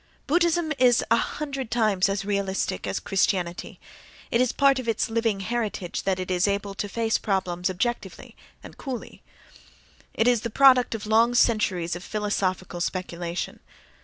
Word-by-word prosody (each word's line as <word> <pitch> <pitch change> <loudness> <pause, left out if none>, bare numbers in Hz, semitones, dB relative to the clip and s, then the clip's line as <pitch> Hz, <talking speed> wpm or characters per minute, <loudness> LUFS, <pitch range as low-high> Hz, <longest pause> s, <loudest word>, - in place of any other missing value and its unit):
—Buddhism 340 0 +2
is 245 -2 +4
a - - +7
hundred 275 0 -3
times 215 -5 +2
as 195 0 -2
realistic 195 - -2
as 95 - -2
Christianity—it 190 +4 -2
is 255 - +2
part 275 -1 +3
of 255 - -6
its 225 0 0
living 225 -3 0
heritage 210 -4 -3
that 190 -1 0
it 185 0 -4
is 180 +2 +2
able 200 0 -2
to 205 +1 -4
face 225 +1 0
problems 185 -3 -1
objectively 235 +6 -4 0.3
and - - -12
coolly; 260 -5 -7 0.9
it 225 - +2
is 245 -3 +3
the 235 - -3
product 255 -1 +5
of 215 - -6
long 225 +3 +3
centuries 190 -8 +2
of 175 - -8
philosophical 190 -4 -2
speculation. 175 -1 -4
210 Hz, 150 wpm, -25 LUFS, 185-240 Hz, 0.9 s, a